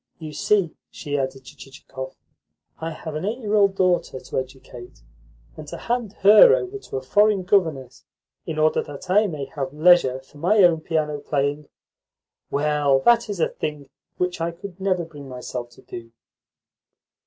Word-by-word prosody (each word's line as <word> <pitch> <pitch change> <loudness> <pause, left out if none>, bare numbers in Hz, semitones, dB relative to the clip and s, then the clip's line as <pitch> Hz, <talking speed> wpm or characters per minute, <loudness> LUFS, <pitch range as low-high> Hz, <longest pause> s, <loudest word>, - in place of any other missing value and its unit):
You 155 -2 -8
see," 190 +1 +1 0.2
she 145 -2 -5
added 135 -1 -3
to 145 - -13
Chichikov, 135 -1 -10 0.6
"I 160 - -3
have 160 0 -7
an 155 +2 -4
eight 215 +5 -2
year 215 -5 -4
old 200 -2 +4
daughter 180 -8 +1
to - - -3
educate; 125 - -10 0.5
and - - -10
to - - -7
hand 235 -4 -2
her 215 - +8
over 405 -3 -4
to 265 - -7
a 130 - -5
foreign 205 +6 +3
governess 160 -10 0 0.4
in 155 - -4
order 155 0 +2
that 145 +6 -8
I 210 +2 +4
may 150 -6 -5
have 135 -2 -3
leisure 155 -5 +4
for 135 +2 -18
my 195 +5 +4
own 165 -3 +4
piano 155 -2 -1
playing 145 0 -2 0.8
well, 145 -1 +2
that 235 - +4
is 200 -3 -4
a - - +2
thing 150 -3 -6 0.3
which 180 -2 -2
I 165 - 0
could 180 +2 -10
never 185 -3 0
bring 145 -4 -11
myself 125 -1 -6
to - - -17
do." 115 -1 -10
155 Hz, 170 wpm, -23 LUFS, 135-190 Hz, 0.8 s, her